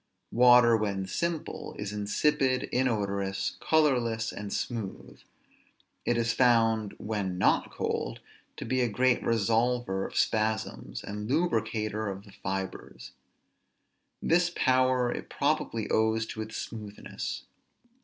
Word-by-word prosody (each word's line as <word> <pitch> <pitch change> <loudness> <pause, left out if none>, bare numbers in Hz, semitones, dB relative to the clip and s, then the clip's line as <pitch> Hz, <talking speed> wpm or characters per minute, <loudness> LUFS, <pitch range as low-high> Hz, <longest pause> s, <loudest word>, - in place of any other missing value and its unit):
Water, 120 -1 +7
when 100 -3 -1
simple, 170 - -3
is 105 0 -4
insipid, 130 +5 +1
inodorous, 100 -6 -1
colorless, 125 -8 +2
and 105 -1 -6
smooth; 110 -4 -4 0.9
it 120 - +2
is 115 0 +1
found, 115 -4 +3
when 100 -4 -3
not 95 - +2
cold, - - -3 0.4
to - - -5
be 130 0 +1
a 120 - +2
great 125 +3 +2
resolver 115 -2 +1
of - - -13
spasms, 110 - -1
and 105 +2 -5
lubricator 110 -8 0
of 100 0 -5
the 100 - -15
fibres; 95 0 -5 1.1
this 175 +1 +3
power 130 -1 +3
it - - -6
probably 110 -2 0
owes 110 0 +2
to 110 - -6
its 110 0 -6
smoothness. 105 -2 -6
110 Hz, 115 wpm, -29 LUFS, 105-125 Hz, 1.1 s, Water